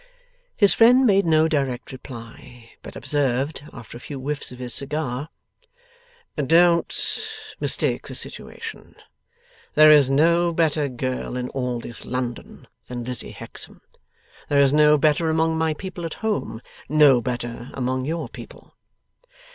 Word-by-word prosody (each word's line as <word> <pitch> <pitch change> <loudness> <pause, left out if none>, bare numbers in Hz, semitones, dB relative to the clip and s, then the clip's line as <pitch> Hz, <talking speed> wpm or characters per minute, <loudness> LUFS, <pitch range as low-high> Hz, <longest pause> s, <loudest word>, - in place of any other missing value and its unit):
His 205 -3 +5
friend 250 +3 +6
made 200 -5 +3
no 160 0 +4
direct 135 -6 -2
reply, 125 -1 -11
but - - -11
observed, 140 0 -1
after 120 -2 -11
a - - -14
few 140 -2 -7
whiffs 145 +1 -4
of 125 - -10
his 125 -1 -1
cigar, 140 -1 -2 1.1
'Don't 170 - +2 0.3
mistake - - 0
the - - -8
situation. - - -8 0.8
There 155 0 +8
is 145 -3 +6
no 170 +5 +3
better 155 -3 +1
girl 125 0 -4
in 125 0 -3
all 125 -2 -3
this 120 0 -8
London 125 -1 -5 0.2
than 120 -1 -5
Lizzie 125 +1 -5
Hexam. - - -7 0.7
There 145 - +3
is 140 0 +4
no 150 0 +5
better 155 +2 +2
among 160 0 +1
my 160 -1 0
people 185 0 -7
at 165 - -5
home; 205 - -2 0.3
no 145 -4 +5
better 120 0 -5
among 130 0 -1
your 160 -2 -3
people. - - -13
145 Hz, 140 wpm, -23 LUFS, 125-160 Hz, 1.1 s, There